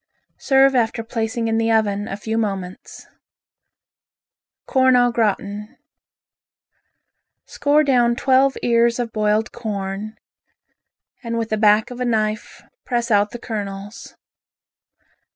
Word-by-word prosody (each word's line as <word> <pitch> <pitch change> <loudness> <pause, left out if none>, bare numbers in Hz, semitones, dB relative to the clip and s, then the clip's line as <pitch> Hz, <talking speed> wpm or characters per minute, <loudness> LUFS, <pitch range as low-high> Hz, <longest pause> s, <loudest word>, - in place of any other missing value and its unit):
Serve 270 -1 +4
after 230 -2 0
placing 225 0 -3
in 225 0 0
the 225 0 +1
oven 205 -2 +1
a 195 - -5
few 220 +1 -4
moments. 195 -5 -4 1.6
Corn 260 -1 +3
au 245 0 +4
Gratin 210 -2 -2 1.7
Score 290 +1 +1
down 245 -4 +2
twelve 265 +2 +2
ears 235 0 +2
of 240 -2 -4
boiled 215 +1 0
corn, 205 -2 -5 1.1
and 230 -1 -3
with 225 -1 -2
the 215 - 0
back 210 +2 +3
of 245 - -8
a 250 - -1
knife 215 -2 -2 0.2
press 240 -2 -2
out 205 0 +3
the 240 - -8
kernels. 205 -2 -7
225 Hz, 115 wpm, -20 LUFS, 210-240 Hz, 1.7 s, Serve